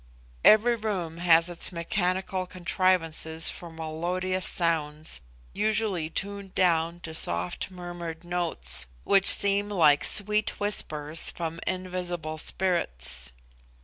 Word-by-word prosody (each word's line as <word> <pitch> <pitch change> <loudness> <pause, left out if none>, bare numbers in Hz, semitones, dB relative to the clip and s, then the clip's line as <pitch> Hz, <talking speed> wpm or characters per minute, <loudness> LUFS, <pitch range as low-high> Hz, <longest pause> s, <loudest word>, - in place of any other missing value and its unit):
Every 220 +3 +5
room 185 -7 -4
has 170 -1 +4
its 175 +1 0
mechanical 185 +2 -2
contrivances 175 -3 +1
for 175 - -10
melodious 175 +4 -3
sounds, 155 - 0 0.3
usually 210 -6 -1
tuned 200 +2 -5
down 170 -1 +1
to 160 - -8
soft 90 - -2
murmured 175 -2 -8
notes, 160 - +2 0.2
which 195 -1 +3
seem 200 +1 +4
like 155 -7 +3
sweet 210 +1 +2
whispers 155 -6 +1
from 165 -1 -6
invisible 180 -4 -3
spirits. 65 - -1
175 Hz, 105 wpm, -26 LUFS, 160-185 Hz, 0.3 s, Every